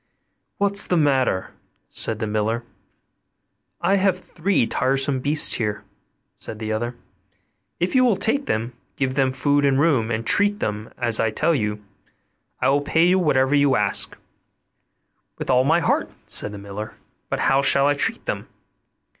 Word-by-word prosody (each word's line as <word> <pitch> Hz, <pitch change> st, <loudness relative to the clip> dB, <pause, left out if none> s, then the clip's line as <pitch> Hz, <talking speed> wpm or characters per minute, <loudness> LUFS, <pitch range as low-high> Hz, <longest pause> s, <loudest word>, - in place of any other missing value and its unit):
'What's 200 Hz, 0 st, +3 dB
the 180 Hz, -, +1 dB
matter?' 135 Hz, -, +1 dB, 0.4 s
said 110 Hz, -, -2 dB
the 110 Hz, -, -3 dB
miller. 110 Hz, +2 st, -1 dB, 1.2 s
'I 195 Hz, -, +2 dB
have 190 Hz, -1 st, +2 dB
three 185 Hz, -5 st, -1 dB
tiresome 135 Hz, +3 st, 0 dB
beasts 145 Hz, +4 st, +3 dB
here,' 105 Hz, -2 st, -2 dB, 0.5 s
said 110 Hz, -, -8 dB
the 110 Hz, 0 st, -5 dB
other; 120 Hz, +3 st, -3 dB, 0.8 s
'if 175 Hz, -, -1 dB
you 255 Hz, -1 st, +4 dB
will 240 Hz, -5 st, +3 dB
take 225 Hz, +8 st, 0 dB
them, 115 Hz, +3 st, -2 dB, 0.2 s
give 130 Hz, -2 st, -1 dB
them 135 Hz, -1 st, +1 dB
food 145 Hz, +2 st, +1 dB
and 135 Hz, -1 st, +2 dB
room, 140 Hz, -8 st, +2 dB
and 115 Hz, 0 st, -3 dB
treat 205 Hz, -, +2 dB
them 105 Hz, +1 st, -4 dB
as 115 Hz, -2 st, +1 dB
I 110 Hz, -, +2 dB
tell 155 Hz, +10 st, 0 dB
you, 105 Hz, -6 st, -3 dB, 0.7 s
I -, -, +2 dB
will 140 Hz, +1 st, +2 dB
pay 160 Hz, +3 st, +2 dB
you 185 Hz, +1 st, +3 dB
whatever 135 Hz, -5 st, +2 dB
you 140 Hz, -2 st, +3 dB
ask.' 105 Hz, -3 st, 0 dB, 1.2 s
'With -, -, -3 dB
all 130 Hz, 0 st, +4 dB
my 165 Hz, +4 st, +3 dB
heart,' 145 Hz, -, 0 dB, 0.2 s
said 105 Hz, -, -1 dB
the 105 Hz, -, -8 dB
miller; 100 Hz, +2 st, -8 dB, 0.3 s
'but -, -, -2 dB
how 135 Hz, +1 st, +3 dB
shall 140 Hz, 0 st, +4 dB
I 145 Hz, -, +3 dB
treat 225 Hz, +11 st, -1 dB
them? -, -, -4 dB
135 Hz, 165 wpm, -22 LUFS, 110-160 Hz, 1.2 s, you